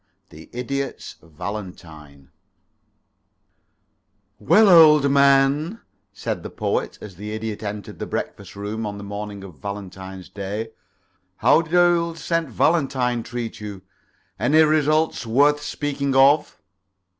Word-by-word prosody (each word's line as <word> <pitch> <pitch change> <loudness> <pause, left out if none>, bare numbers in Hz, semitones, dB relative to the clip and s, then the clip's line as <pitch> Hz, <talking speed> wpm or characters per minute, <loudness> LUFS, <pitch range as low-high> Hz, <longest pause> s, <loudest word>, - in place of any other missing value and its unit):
III 80 +1 -12
THE 120 - -8
IDIOT'S 140 +2 -4
VALENTINE 80 -5 -9 2.1
"Well, 215 0 +5
old 150 -6 +7
man," 140 +7 +3 0.3
said 100 - -4
the - - -7
Poet, - - -2
as 100 -4 -10
the 105 +2 -6
Idiot 110 -1 -5
entered 105 -1 -6
the - - -4
breakfast 100 -1 -5
room 105 +2 -4
on 100 0 -6
the 100 - -8
morning 100 0 -6
of 90 -8 -12
Valentine's 95 -1 -8
day, 105 +3 -5 0.7
"how - - +4
did 165 +1 -4
old 170 -1 +3
St. 165 -2 -1
Valentine 130 -4 +1
treat 115 0 -6
you? 100 -3 -8 0.6
Any 155 +2 +4
results 155 -3 +1
worth 145 +5 +3
speaking 140 -2 -3
of?" 140 +3 +4
120 Hz, 120 wpm, -22 LUFS, 100-150 Hz, 2.1 s, old